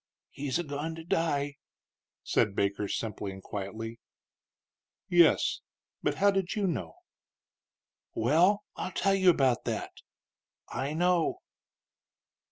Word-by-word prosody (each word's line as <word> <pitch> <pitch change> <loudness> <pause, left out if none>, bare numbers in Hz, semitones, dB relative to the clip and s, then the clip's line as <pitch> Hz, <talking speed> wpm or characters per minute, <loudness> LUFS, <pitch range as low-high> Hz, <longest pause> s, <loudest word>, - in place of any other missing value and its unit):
"He's 140 0 -2
a 175 - -1
goin' 150 +2 -4
to 165 - -8
die," 145 -4 0 0.7
said 100 -2 +1
Baker, 100 +1 0
simply 105 -2 -3
and 95 0 -10
quietly. 110 +3 -5 1.1
"Yes; 170 -3 +4 0.4
but - - 0
how 200 +1 +4
do 195 -1 +1 0.2
you 200 - +1
know?" 110 - -2 1.2
"Well, 175 - +3
I'll 185 - -4
tell 195 - +2
you 190 -1 +5
about 135 -7 +3
that; - - -3 0.8
I 140 +3 -3
know." 175 0 +2
145 Hz, 115 wpm, -29 LUFS, 115-175 Hz, 1.2 s, you